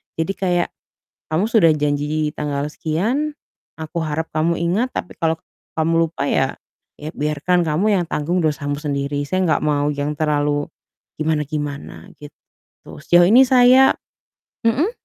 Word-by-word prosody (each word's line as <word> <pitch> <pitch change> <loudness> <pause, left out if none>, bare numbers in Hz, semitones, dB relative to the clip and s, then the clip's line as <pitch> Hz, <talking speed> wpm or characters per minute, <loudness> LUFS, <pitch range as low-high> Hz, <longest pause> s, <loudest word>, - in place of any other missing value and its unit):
Jadi 160 +4 -1
kayak, 180 -3 0 0.6
"Kamu 170 +7 +1
sudah 215 -8 +4
janji 150 0 -1
tanggal 145 -1 -2
sekian, 225 - -2 0.4
aku 160 +1 -4
harap 160 +1 -2
kamu 165 +2 +1
ingat. 190 +10 0
Tapi - - -5
kalau 160 -1 0 0.4
kamu 165 +1 +2
lupa 140 -3 -3
ya 135 0 +1 0.4
ya 150 +1 -7
biarkan 155 +4 0
kamu 160 +7 +1
yang 180 -2 +1
tanggung 170 +4 0
dosamu 145 -2 -1
sendiri." 145 -1 -2
Saya 185 +5 0
nggak 155 - +1
mau 145 -1 +1
yang 145 +1 -3
terlalu 145 -1 0 0.5
gimana-gimana, 150 -2 -3
gitu. 145 0 -12 0.7
Sejauh 175 +1 +5
ini 255 +3 +7
saya 255 +1 +6 0.7
mhm? 265 - +2
155 Hz, 135 wpm, -20 LUFS, 150-180 Hz, 0.7 s, ini